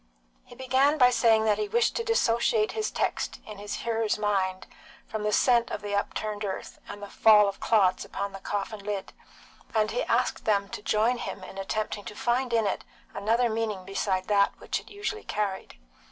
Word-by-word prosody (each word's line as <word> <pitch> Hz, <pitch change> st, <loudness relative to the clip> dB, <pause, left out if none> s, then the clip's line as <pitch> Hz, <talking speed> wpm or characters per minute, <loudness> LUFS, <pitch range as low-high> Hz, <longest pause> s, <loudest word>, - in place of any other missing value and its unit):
He 245 Hz, -, -15 dB
began 260 Hz, +4 st, +2 dB
by 250 Hz, -3 st, +6 dB
saying 225 Hz, -2 st, +4 dB
that 210 Hz, -1 st, +2 dB
he 210 Hz, -, -1 dB
wished 235 Hz, +3 st, +1 dB
to 465 Hz, -, -1 dB
dissociate 235 Hz, -, +2 dB
his 435 Hz, -1 st, -2 dB
text -, -, -2 dB
in 210 Hz, -2 st, -9 dB
his 205 Hz, 0 st, -5 dB
hearers' 225 Hz, -2 st, 0 dB
minds 190 Hz, -3 st, 0 dB, 0.4 s
from 220 Hz, -, -4 dB
the 210 Hz, 0 st, 0 dB
scent 240 Hz, +1 st, +3 dB
of -, -, -5 dB
the 205 Hz, 0 st, -4 dB
upturned 210 Hz, +1 st, -2 dB
earth, 195 Hz, -2 st, -5 dB
and 205 Hz, -, -8 dB
the -, -, -6 dB
fall 210 Hz, 0 st, +6 dB
of 200 Hz, -, -4 dB
clods 190 Hz, -5 st, +3 dB
upon 200 Hz, +1 st, -4 dB
the 195 Hz, -, -8 dB
coffin 205 Hz, +1 st, -4 dB
lid, 205 Hz, -1 st, -4 dB, 0.6 s
and 215 Hz, -1 st, +2 dB
he 240 Hz, -, -1 dB
asked 250 Hz, +2 st, 0 dB
them 200 Hz, -2 st, +1 dB
to -, -, -6 dB
join 220 Hz, +4 st, +1 dB
him 195 Hz, -, -6 dB
in 195 Hz, +1 st, -9 dB
attempting 210 Hz, +1 st, -3 dB
to -, -, -7 dB
find 250 Hz, +1 st, 0 dB
in 225 Hz, -2 st, +2 dB
it 195 Hz, -, -1 dB, 0.3 s
another 225 Hz, +4 st, +1 dB
meaning 220 Hz, -4 st, -2 dB
beside 190 Hz, -1 st, -1 dB
that 200 Hz, -1 st, +2 dB
which -, -, -2 dB
it -, -, -16 dB
usually 420 Hz, +1 st, -4 dB
carried. 200 Hz, -, -3 dB
215 Hz, 195 wpm, -27 LUFS, 200-235 Hz, 0.6 s, by